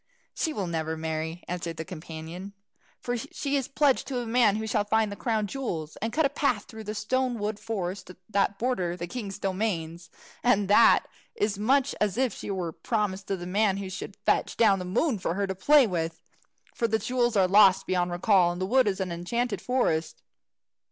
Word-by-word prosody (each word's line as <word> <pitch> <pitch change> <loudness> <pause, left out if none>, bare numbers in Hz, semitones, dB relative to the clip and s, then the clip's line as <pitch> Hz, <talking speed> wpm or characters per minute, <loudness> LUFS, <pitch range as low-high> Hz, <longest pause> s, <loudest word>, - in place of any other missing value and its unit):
"She 320 - -1
will 205 -10 -3
never 160 -2 -2
marry," 160 +1 -4
answered 170 -2 -4
his 160 - -4
companion, 165 +3 -8 0.5
"for 245 - -2
she 280 +2 -3
is 270 -3 0
pledged 280 -1 +2
to 270 - -4
the 245 -1 -2
man 225 -3 +3
who 220 +1 -3
shall 215 -1 +1
find 215 0 +1
the - - -5
crown 220 -2 -1
jewels, 185 - -4
and 225 +2 -3
cut 315 +3 +2
a - - +3
path 270 -7 0
through 220 -2 -10
the 210 +1 -4
stone 255 +3 0
wood 210 0 -3
forest 190 -4 -4 0.2
that 200 -1 +1
borders 190 -7 -1
the 175 - -4
king's 200 0 -6
domains. 180 -4 -3 0.3
And 205 -5 +3
that 220 +3 +6 0.3
is 205 -1 -1
much 270 +5 +2
as 210 0 +1
if 260 -2 +1
she - - -7
were 185 -4 -2
promised 200 0 -2
to 195 - -1
the 175 - -7
man 195 +1 +1
who 195 -1 -5
should 185 - -7
fetch - - +1
down 205 -4 +4
the 180 - -5
moon 220 - 0
for 175 -2 -2
her 200 +1 0
to 190 - -3
play 275 +9 +5
with. 165 -5 -2 0.5
For 230 - 0
the 220 0 +1
jewels 240 -1 0
are 190 -2 +4
lost 195 0 +6
beyond 180 -1 0
recall, 175 0 +3
and 175 - -6
the 185 - 0
wood 255 +4 +3
is 195 -1 0
an 185 -2 -2
enchanted 200 +4 -2
forest." 205 -11 -1
205 Hz, 205 wpm, -27 LUFS, 180-235 Hz, 0.5 s, that